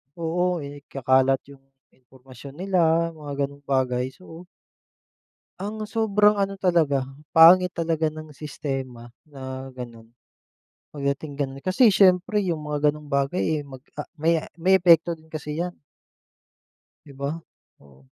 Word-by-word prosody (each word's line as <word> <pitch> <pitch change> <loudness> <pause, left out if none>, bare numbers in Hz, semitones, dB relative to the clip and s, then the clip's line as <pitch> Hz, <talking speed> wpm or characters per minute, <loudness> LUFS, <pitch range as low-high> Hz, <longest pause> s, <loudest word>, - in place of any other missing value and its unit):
oo, 175 0 -1
ikakalat 135 -2 0
'yung 140 - -15 0.3
impormasyon 130 +1 -15
nila, 170 -2 +1
mga 150 -3 -8
ganong 140 0 -7
bagay. 130 -2 0
So 175 -1 -13 1.1
ang 210 +2 -5
sobrang 210 -1 +3
ano 195 0 -2
talaga, 165 -7 +2 0.3
pangit 180 +3 +7
talaga 165 -2 -1
ng 155 0 -9
sistema 135 -5 -6 0.2
na 130 -2 -8
gano'n. 120 -3 -9 0.9
Pagdating 140 +1 -3
gano'n 135 -1 -4
kasi 215 +5 +5
siyempre 190 +1 +4
yung 155 -4 -3
mga 150 0 +2
gano'ng 150 -1 -12
bagay, 140 +5 0
eh, 155 -2 -1
mag, 130 -2 -11 0.2
ah, - - -4
may 165 +1 +1 0.2
may 190 +2 +5
epekto 170 -1 +4
din 155 - -21
kasi 150 -1 -6
'yan. 175 +1 -2 1.3
'Di 140 - -13
ba? 140 +1 -3 0.5
Oo. 70 -1 -21
155 Hz, 130 wpm, -24 LUFS, 135-175 Hz, 1.3 s, pangit